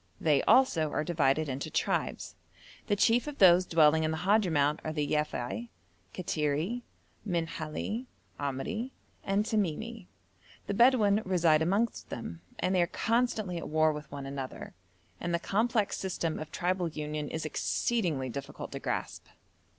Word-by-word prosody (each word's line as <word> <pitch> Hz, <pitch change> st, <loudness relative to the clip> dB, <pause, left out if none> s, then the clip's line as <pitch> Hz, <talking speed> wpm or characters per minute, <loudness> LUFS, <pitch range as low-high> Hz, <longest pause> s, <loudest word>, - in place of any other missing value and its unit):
They 150 Hz, -4 st, +3 dB
also 165 Hz, -, +4 dB
are 150 Hz, -, 0 dB
divided 155 Hz, -2 st, +1 dB
into 140 Hz, +3 st, -4 dB
tribes. -, -, -1 dB, 0.5 s
The 205 Hz, -, +2 dB
chief 230 Hz, +6 st, +3 dB
of 295 Hz, -1 st, -5 dB
those 180 Hz, -1 st, +6 dB
dwelling 160 Hz, -1 st, +4 dB
in 155 Hz, -, +1 dB
the 160 Hz, -, -2 dB
Hadhramout 165 Hz, -6 st, +2 dB
are 155 Hz, -, -2 dB
the 150 Hz, -2 st, -1 dB
Yafei, 120 Hz, -6 st, -2 dB, 0.4 s
Kattiri, 165 Hz, +6 st, -1 dB, 0.4 s
Minhali, 170 Hz, +5 st, -3 dB, 0.3 s
Amri, 145 Hz, -, -3 dB, 0.3 s
and 200 Hz, +1 st, +1 dB
Tamimi. 215 Hz, +1 st, -2 dB, 0.6 s
The -, -, -2 dB
Bedouin 220 Hz, -3 st, +5 dB
reside 170 Hz, -4 st, +3 dB
amongst 200 Hz, +8 st, 0 dB
them, 85 Hz, -8 st, -6 dB, 0.2 s
and 185 Hz, -, 0 dB
they 185 Hz, -, +4 dB
are 175 Hz, -, +2 dB
constantly 225 Hz, -5 st, 0 dB
at -, -, -7 dB
war 155 Hz, 0 st, +3 dB
with 150 Hz, -1 st, -8 dB
one 140 Hz, -1 st, -6 dB
another, 135 Hz, -1 st, -6 dB, 0.5 s
and 175 Hz, 0 st, -1 dB
the -, -, 0 dB
complex 215 Hz, +3 st, 0 dB
system 175 Hz, -4 st, -2 dB
of 155 Hz, 0 st, -7 dB
tribal 180 Hz, 0 st, 0 dB
union 150 Hz, -1 st, -4 dB
is 160 Hz, 0 st, -4 dB
exceedingly 160 Hz, -, 0 dB
difficult 140 Hz, +3 st, -6 dB
to -, -, -5 dB
grasp. -, -, -3 dB
170 Hz, 145 wpm, -30 LUFS, 150-205 Hz, 0.6 s, those